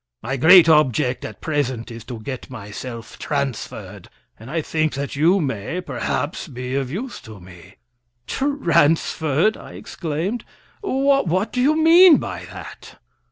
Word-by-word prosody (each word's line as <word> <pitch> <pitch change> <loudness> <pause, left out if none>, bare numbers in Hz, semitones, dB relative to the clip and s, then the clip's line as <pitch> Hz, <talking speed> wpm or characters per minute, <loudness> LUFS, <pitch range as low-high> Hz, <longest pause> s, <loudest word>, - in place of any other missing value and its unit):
My 135 +4 -2
great 165 +5 +7
object 130 -5 +2
at - - -8
present 130 -6 -2
is 115 -1 -9
to 120 -2 -7
get 130 +3 -7
myself 115 0 -8
transferred, 140 -6 -4 0.3
and 115 +3 -11
I 165 +3 -1
think 155 -1 -1
that 140 +1 -4
you 170 +7 +3
may, 135 - -3
perhaps, 145 +2 -3
be 125 -2 -6
of 135 -2 -1
use 235 - -6
to 110 -2 -12
me." 90 +1 -15 0.5
"Transferred!" 170 - +1
I - - -12
exclaimed. 175 +7 -4 0.4
"What 270 - +1
do 250 - 0
you 300 +4 +3
mean 335 +1 +8
by - - -6
that?" - - -11
150 Hz, 140 wpm, -21 LUFS, 125-185 Hz, 0.5 s, mean